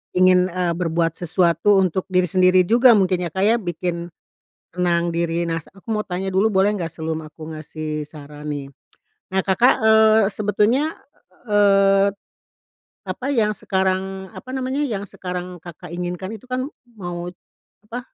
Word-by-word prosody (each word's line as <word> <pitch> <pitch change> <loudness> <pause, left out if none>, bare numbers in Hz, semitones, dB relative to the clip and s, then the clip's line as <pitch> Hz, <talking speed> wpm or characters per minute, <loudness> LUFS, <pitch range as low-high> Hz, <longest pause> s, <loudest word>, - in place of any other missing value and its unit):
ingin, 185 0 +4
eee, 175 -1 0
berbuat 165 -1 0
sesuatu 175 +3 +2
untuk 185 0 0
diri 180 0 +3
sendiri 185 0 +5
juga 240 +2 +6
mungkin 185 -3 +2
ya 165 - -5
Kak 190 +1 0
ya 225 +3 +4
bikin 175 -2 -4 0.7
tenang 175 -1 +1
diri, 170 0 -1
nah 165 0 -1
aku 195 +7 -17
mau 210 0 -1
tanya 185 +1 -3
dulu 195 +4 +3
boleh 205 +2 +3
nggak 170 -3 -4
sebelum 160 -1 -4
aku 155 +1 -10
ngasih 155 0 -5
saran 150 0 -11
nih? 145 -2 -4 0.7
Nah 190 - +2
Kakak, 230 +7 +4
eee, 220 0 +5
sebetulnya, 215 +8 +1 0.6
eee, 195 -1 +4 1.0
apa 260 - -4
yang 225 -6 +2
sekarang 190 -1 -2
apa - - -12
namanya, 260 +2 -2
yang 205 -5 -3
sekarang 180 -2 -6
Kakak 170 -1 -11
inginkan 180 +3 -4
itu 255 - -20
kan 255 +1 -2 0.3
mau 175 -2 -5 0.6
apa, 235 +3 -6
185 Hz, 150 wpm, -21 LUFS, 170-205 Hz, 1.0 s, juga